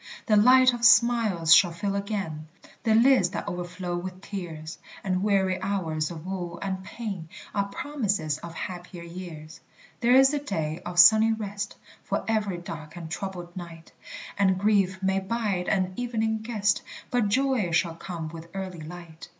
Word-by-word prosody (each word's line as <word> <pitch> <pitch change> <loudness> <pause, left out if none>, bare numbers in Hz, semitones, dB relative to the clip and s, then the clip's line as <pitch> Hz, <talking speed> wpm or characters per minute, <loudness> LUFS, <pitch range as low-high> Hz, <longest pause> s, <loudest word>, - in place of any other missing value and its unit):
The 215 - +3
light 255 +4 +6
of 240 -1 -5
smiles 230 -9 +5
shall 175 +1 +6
fill 195 +4 -3
again 195 -7 -3 0.3
The 220 -2 +2
lids 235 -5 +5
that 205 - -5
overflow 175 0 -4
with 180 +1 -5
tears; 165 -6 -7 0.2
And 185 -1 0
weary 190 -2 +1
hours 165 -6 -1
of 165 -2 -8
woe 180 -2 -4
and 190 -1 -4
pain 195 -5 -6 0.2
Are 200 -1 0
promises 200 - -2
of 170 +1 -9
happier 175 0 -7
years. 170 -3 -9 0.4
There 245 +1 +4
is 270 +2 +6
a 290 - +1
day 160 - -3
of 175 0 -6
sunny 220 +5 +8
rest 205 -2 -5 0.3
For - - -2
every 210 -5 0
dark 160 -2 -8
and 165 -2 -8
troubled 180 -2 -6
night; 170 -2 -9 0.5
And 190 -2 +3
grief 195 -2 +1
may 190 0 +2
bide 195 -2 -2
an 185 -2 +1
evening 220 -2 -1
guest, 210 -2 0 0.3
But 240 -4 +2
joy 260 -4 +1
shall 170 0 +1
come 165 -1 -6
with 165 +1 -10
early 185 -3 -5
light. 165 0 -10
190 Hz, 160 wpm, -26 LUFS, 170-215 Hz, 0.5 s, sunny